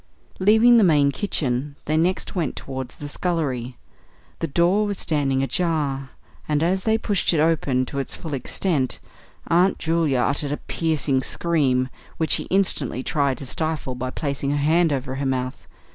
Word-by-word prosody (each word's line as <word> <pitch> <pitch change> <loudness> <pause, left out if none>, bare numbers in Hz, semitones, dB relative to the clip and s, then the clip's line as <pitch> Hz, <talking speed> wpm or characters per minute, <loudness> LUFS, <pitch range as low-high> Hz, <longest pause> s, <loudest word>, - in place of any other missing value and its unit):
Leaving 220 +5 +6
the - - +5
main 145 -5 +4
kitchen, 140 -6 -2
they 155 - 0
next 175 +4 0
went 170 -6 -1
towards 130 -2 -6
the 145 - -7
scullery. 140 -7 -2 0.6
The 165 - -1
door 175 +7 +2
was 200 -2 -2
standing 135 -4 +1
ajar, 140 -4 -1 0.4
and 150 +1 +2
as 185 +3 +1
they 220 0 +3
pushed 205 -5 0
it - - +2
open 145 -5 +2
to 140 +2 -4
its 135 - -4
full 160 -3 -7
extent 135 +1 -1 0.5
Aunt 180 +3 +3
Julia 160 -6 +1
uttered 145 +2 0
a - - -2
piercing 155 -5 0
scream, 135 -6 +1 0.3
which 160 -2 -1
she - - +3
instantly 155 -10 0
tried 140 -4 0
to 140 - -7
stifle 155 -1 -2
by 125 +1 -4
placing 140 0 -3
her 145 - +1
hand 160 +3 +3
over 130 -1 -2
her 140 - -2
mouth. 130 -1 -3
150 Hz, 165 wpm, -23 LUFS, 135-170 Hz, 0.6 s, Leaving